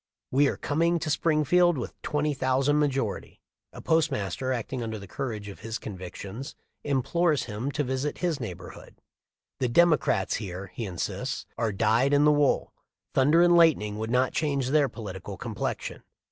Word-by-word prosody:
We 140 +2 +4
are - - -1
coming 170 +4 +1
to 155 -1 -2
Springfield 160 +2 +3
with 120 - -6
20,000 145 -1 +1
majority!" 135 -7 -1 0.3
A - - -11
postmaster, 130 - 0
acting 125 +1 -3
under 110 -1 -4
the 100 - -9
courage 110 -3 -5
of 100 - -9
his 115 +1 -4
convictions, 100 +6 -7 0.3
implores 150 +3 +1
him 115 +5 -4
to 150 - 0
visit 130 +2 -2
his 170 -5 -1
neighborhood. 90 -7 -8 0.6
"The 125 - +1
Democrats 150 - +3
here," 95 -2 -6
he 115 - -4
insists, 90 -3 -4
"are 115 -2 0
dyed 115 +7 +2
in 145 +1 +4
the 150 - +6
wool. 145 -1 +2 0.4
Thunder 150 +6 +5
and 175 0 +5
lightning 125 -12 +4
would 110 +1 -3
not 125 +2 +2
change 140 -4 0
their 145 -1 +3
political 100 -6 -7
complexion. - - -4
130 Hz, 155 wpm, -27 LUFS, 110-150 Hz, 0.6 s, the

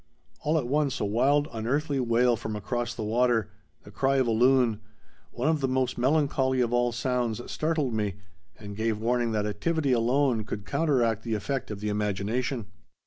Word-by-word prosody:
All 155 +2 +1
at 145 - -1
once 140 +1 0
a - - 0
wild 140 +8 +2
unearthly 140 +6 -1
wail 120 0 +3
from 110 -1 -5
across 120 +3 -3
the 110 - -4
water, 115 0 +1 0.3
the - - -13
cry 135 +1 +1
of 130 -1 +3
a 115 - +1
loon, 120 -1 +3 0.5
one 125 +4 -3
of 155 -2 +2
the 135 - +1
most 130 0 0
melancholy 130 -1 +1
of 120 -1 +1
all 120 0 +2
sounds, 120 -2 -1
startled 155 -5 -1
me, 105 -3 -1 0.4
and 100 -2 -9
gave 110 0 -1
warning 120 +1 0
that 105 -1 0
activity 140 +8 -1
alone 125 0 +2
could 105 -1 -6
counteract 120 - +1
the 115 -1 -2
effect 135 +5 -3
of 105 -2 -6
the 105 - -2
imagination. 105 +4 -1
120 Hz, 180 wpm, -27 LUFS, 110-135 Hz, 0.5 s, wail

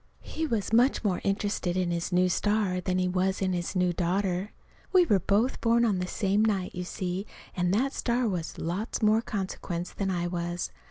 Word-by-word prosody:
He 320 0 -3
was 225 -5 -2
much 245 +3 +4
more 190 -4 0
interested 195 -3 -1
in 180 -2 0
his 170 +1 -2
new 180 +1 +4
star 200 0 +1
than 185 0 -1
he 185 0 +1
was 185 +1 0
in 190 -1 0
his 175 +2 -3
new 180 -1 +2
daughter. 185 +2 -1 0.4
We 370 -2 +6
were 205 - +3
both 210 +8 +1
born 235 0 +3 0.2
the 180 - -2
same 200 +2 +1
night, 200 -4 0
you 180 0 -4
see, 185 +2 -3 0.3
and 180 -1 +1
that 270 +5 +1
star 240 0 0
was 175 -5 -3
lots 195 +8 -3
more 215 +1 +4
consequence 185 -4 -4
than 195 -1 -2
I 175 -2 -1
was. 175 0 -3
190 Hz, 195 wpm, -28 LUFS, 180-215 Hz, 0.4 s, We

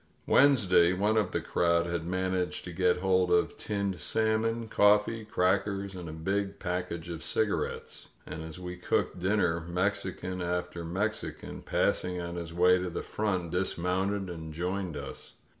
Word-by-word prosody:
Wednesday 100 -11 +5
one 105 +4 +1
of 105 -4 +2
the 85 - -1
crowd 85 0 +2
had 85 -1 -3
man 95 +1 -1
aged 90 -1 -1
to 90 - -7
get 90 +1 +2
hold 95 -1 +3
of 90 0 +2
tinned 100 -4 -2
salmon, 110 +5 0
coffee, 105 +2 +3
crackers 100 0 0
and 90 -3 -7
a - - -5
big 95 +5 -2
package 90 -2 -3
of 85 -2 -5
cigarettes; 110 -2 -2 0.2
and 80 - -6
as 80 +2 -7
we 90 0 -6
cooked 90 - 0
dinner 90 -3 +2
Mexican 90 0 -2
after 90 -1 -2
Mexican, 100 +6 -3
passing 90 0 0
on 85 0 -4
his 85 -1 -5
way 90 +2 +4
to 90 0 -2
the 85 - -4
front, 95 -6 -2
dismounted 95 +2 0
and 80 -3 -7
joined 90 -1 -2
us. 70 - -8
90 Hz, 160 wpm, -30 LUFS, 85-100 Hz, 0.2 s, Wednesday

